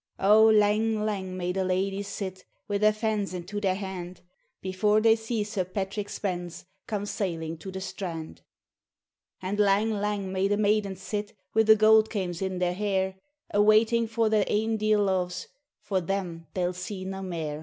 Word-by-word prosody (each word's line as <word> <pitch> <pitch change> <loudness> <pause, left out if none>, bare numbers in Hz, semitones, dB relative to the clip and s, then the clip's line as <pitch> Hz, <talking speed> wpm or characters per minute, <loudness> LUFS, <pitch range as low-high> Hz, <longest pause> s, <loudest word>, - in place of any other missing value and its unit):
O 210 +3 +6
lang 215 0 +3
lang 190 -3 -3
may 180 0 -1
the 190 +1 -1
ladyes 195 +2 -1
sit, 190 -2 -5 0.2
Wi' 205 -1 -1
their 215 +1 +5
fans 215 -3 -2
into 190 +4 -5
their 190 -2 +1
hand, 185 -2 -6 0.4
Before 195 +3 +2
they 225 0 +5
see 225 -1 -2
Sir 205 -2 -2
Patrick 195 +2 -4
Spens 175 -3 -4 0.2
Come 205 -2 -2
sailing 165 -6 -3
to 190 - -8
the 190 0 -6
strand! 185 -4 -6 1.0
And 200 +3 -2
lang 205 +2 +3
lang 205 -2 -2
may 190 +1 +1
the 205 0 +1
maidens 205 -2 +1
sit, 210 +1 -4 0.2
Wi' 220 - +5
the 220 0 +7
goud 220 0 +5
kaims 180 -5 -3
in 190 -1 -2
their 180 0 +1
hair, 190 -1 -1 0.4
A' 205 - +4
waiting 220 +2 +4
for 225 0 +1
their 215 -2 +3
ain 220 +1 +1
dear 215 0 +2
loves 185 -3 0 0.4
For 190 -2 0
them 175 -3 -3
they'll 180 -1 0
see 185 +1 -6
na 190 0 -5
mair. 160 -5 -4
200 Hz, 175 wpm, -27 LUFS, 185-215 Hz, 1.0 s, the